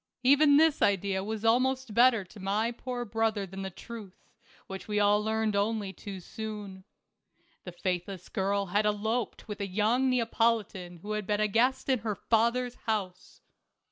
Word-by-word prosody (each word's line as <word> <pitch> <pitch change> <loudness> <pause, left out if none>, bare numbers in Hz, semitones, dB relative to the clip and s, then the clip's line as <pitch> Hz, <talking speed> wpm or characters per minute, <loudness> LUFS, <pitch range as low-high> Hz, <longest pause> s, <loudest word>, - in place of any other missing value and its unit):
Even 285 +2 +6
this 315 -1 +4
idea 195 -1 +1
was 220 +1 -4
almost 255 +1 +2
better 235 -2 +5
to 190 +3 -15
my 205 +4 0
poor 245 0 -5
brother 220 -2 0
than 190 +1 -8
the 190 - -4
truth, 205 0 -10 0.5
which 190 0 -8
we 210 -1 0
all 205 +1 +3
learned 220 -1 0
only 205 -1 0
too 195 -1 -8
soon. 205 -1 -7 0.8
The 180 - -6
faithless 180 +1 -4
girl 200 +1 0
had 205 +3 +1
eloped 220 +3 -2
with 210 -1 -6
a 200 - -2
young 220 +7 +2
Neapolitan 225 -7 0
who 210 - -5
had 210 -2 -3
been 210 -1 +1
a 215 - +3
guest 245 +5 +1
in 260 -3 +2
her 215 -1 -3
father's 235 +4 +1 0.2
house. 190 -4 -3
215 Hz, 165 wpm, -29 LUFS, 195-235 Hz, 0.8 s, Even